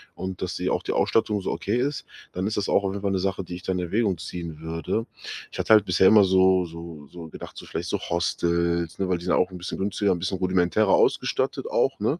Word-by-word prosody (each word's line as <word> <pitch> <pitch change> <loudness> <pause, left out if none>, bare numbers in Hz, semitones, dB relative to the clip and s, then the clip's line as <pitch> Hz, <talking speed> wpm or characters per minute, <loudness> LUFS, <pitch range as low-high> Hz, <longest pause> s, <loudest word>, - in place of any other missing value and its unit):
und 95 -1 -6
dass 90 -2 -3
sie - - -1
auch - - 0
die - - -3
Ausstattung 105 -2 +1
so - - -2
okay 105 - -2
ist, 140 +3 -1 0.3
dann 95 +2 -2
ist 110 - -2
das 100 - 0
auch 100 - +3
auf 95 -1 -1
jeden 100 0 -6
Fall 100 - +1
'ne 95 - 0
Sache, 95 0 -1
die 90 0 -7
ich 90 - -9
da 95 - -1
in 90 - -1
Erwägung 95 +2 0
ziehen 85 -3 -7
würde. 80 +7 -3 0.5
Ich - - -8
hatte - - -1
halt 105 -2 +6
bisher 90 +1 +4
immer 105 +1 +7
so 95 -1 +4
so 85 -3 -9
so 85 -2 -9
gedacht, - - -10
so - - -9
vielleicht - - -4
so - - -1
Hostels, 85 0 0
ne, 95 - -1
weil 90 -2 0
die 85 - -10
sind 90 - +2
auch 90 - +2
'n 90 - -7
bisschen 90 - -5
günstiger, 100 +1 0
'n 85 - -4
bisschen 90 +2 -2
rudimentärer 95 +2 +2
ausgestattet - - +1
auch, - - +1
ne? 115 - 0
95 Hz, 255 wpm, -25 LUFS, 85-100 Hz, 0.5 s, immer